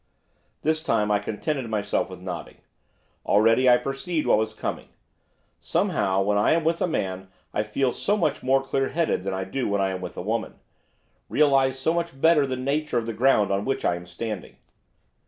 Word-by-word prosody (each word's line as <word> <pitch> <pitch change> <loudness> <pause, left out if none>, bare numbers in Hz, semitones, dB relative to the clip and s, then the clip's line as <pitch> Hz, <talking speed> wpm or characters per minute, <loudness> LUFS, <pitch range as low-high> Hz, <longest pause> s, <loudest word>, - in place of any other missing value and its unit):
This 155 0 +1
time 105 -10 +1
I 105 - +3
contented 120 +5 -3
myself 105 -3 -1
with 90 -1 -9
nodding. 90 -3 -7 0.7
Already 115 +5 +4
I 125 - +7
perceived 135 +6 -3
what - - +4
was 110 0 -1
coming; - - -4 0.7
somehow, 95 0 +1
when 105 +1 +1
I 105 - +4
am 165 0 +1
with 165 +1 0
a - - +2
man 95 - -3 0.3
I - - +1
feel 125 +5 0
so 205 +10 0
much 155 -7 0
more 135 +1 +2
clear 135 0 -1
headed 165 - 0
than 95 0 -3
I 95 - -2
do 125 +8 -3
when 100 0 0
I 95 -1 +1
am 95 -1 -5
with 90 - -7
a - - -4
woman, 110 +3 -2 0.7
realise 135 -3 +3
so 150 +5 0
much 170 -5 -3
better 155 -2 +4
the 130 -1 -3
nature 140 +1 -1
of 115 - 0
the 115 - -3
ground 110 -4 +3
on 100 +1 0
which 135 +3 -2
I 85 - +2
am 90 0 -9
standing. 100 +2 -6
120 Hz, 195 wpm, -25 LUFS, 100-140 Hz, 0.7 s, I